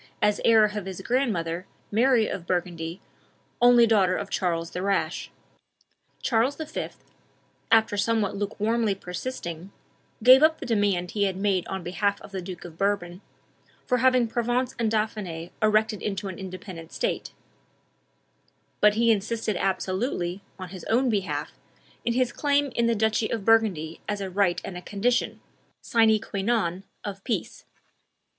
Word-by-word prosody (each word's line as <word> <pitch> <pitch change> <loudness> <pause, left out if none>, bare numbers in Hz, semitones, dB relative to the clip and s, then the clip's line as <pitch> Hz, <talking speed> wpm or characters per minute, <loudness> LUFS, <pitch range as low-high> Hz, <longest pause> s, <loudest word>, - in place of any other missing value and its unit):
as 210 -1 +2
heir 220 -2 +6
of 210 -2 -4
his 190 -2 -6
grandmother, 185 -9 -1 0.2
Mary 235 +1 +4
of 175 -2 -5
Burgundy, 175 -1 -2 0.6
only 240 -1 +7
daughter 195 -5 +3
of 200 -1 -5
Charles 170 -3 -1
the 180 - -4
Rash. 195 0 -1 0.9
Charles 245 +3 +2
V., 315 -1 -4 0.8
after 220 -2 +4
somewhat 210 -1 +1
lukewarmly 210 +1 0
persisting, 180 -2 -6 0.5
gave 255 +3 +9
up 315 +1 +5
the - - -6
demand 200 -6 +1
he 205 -1 +1
had 190 -2 -1
made 195 -2 0
on 190 -2 -4
behalf 200 +3 0
of - - -12
the 190 -1 -4
Duke 180 -1 -8
of 165 -2 -11
Bourbon, 195 -2 -1 0.6
for 250 - +1
having 255 -1 +4
Provence 245 +2 0
and 230 -2 +2
Dauphiny 205 -6 -2
erected 215 -1 +2
into 195 -1 -3
an 185 - -8
independent 185 -3 -8
state; - - -2 1.5
but 210 0 +5
he 230 +1 +4
insisted 220 0 -1
absolutely, 185 0 -1 0.2
on 185 -2 -7
his 185 -1 -9
own 245 +2 +2
behalf, 195 -3 -2 0.5
in 235 - 0
his 250 0 +1
claim 285 0 +1
to 235 -1 +1
the 235 - +2
duchy 220 +1 +1
of 220 -4 -3
Burgundy 195 -9 +2
as 205 -1 -1
a 195 -1 -4
right 185 -2 +2
and 190 - -6
a 180 - -6
condition, 220 +6 -1 0.4
sine 225 -3 +4
qua 200 -1 -4
non, 195 -4 0 0.2
of 195 -1 -6
peace. 235 - -3
205 Hz, 150 wpm, -26 LUFS, 185-230 Hz, 1.5 s, gave